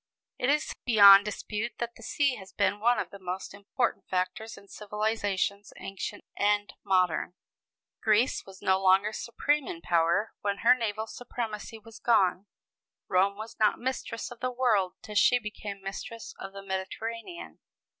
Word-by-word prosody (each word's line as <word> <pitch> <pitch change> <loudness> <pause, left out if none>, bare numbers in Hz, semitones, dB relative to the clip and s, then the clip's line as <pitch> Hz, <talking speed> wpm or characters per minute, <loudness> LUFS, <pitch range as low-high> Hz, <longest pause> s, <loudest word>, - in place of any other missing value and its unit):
It 250 - +1
is 300 +1 +1
beyond 200 -4 +8
dispute 210 +2 -4
that 235 0 -4
the - - -15
sea 280 +3 +1
has 190 -1 -12
been 205 - +1
one 240 +3 +3
of - - -3
the 200 - -10
most 185 +1 -5
important 205 +5 -2
factors 185 +5 -2
in 200 - -15
civilizations 205 -1 -2
ancient 195 +1 -6
and 205 0 +1
modern. 180 -3 +1 0.7
Greece 220 +4 +2
was 195 0 -14
no 190 0 +3
longer 195 +3 +4
supreme 290 +5 -1
in 165 - -5
power 170 +5 +1
when 200 -1 -2
her 240 - +9
naval 220 -3 -2
supremacy 225 -2 -6
was 225 +1 -14
gone; 195 -4 +2 0.6
Rome 195 +2 +2
was 220 +1 -8
not 215 -1 +3
mistress 245 -2 -4
of 240 - -10
the 255 - -1
world 230 -7 +1
till 210 - -8
she 245 +4 +5
became 210 -3 -7
mistress 205 +4 -7
of 195 - -7
the 195 0 -9
Mediterranean. 225 - -5
210 Hz, 155 wpm, -28 LUFS, 195-230 Hz, 0.7 s, her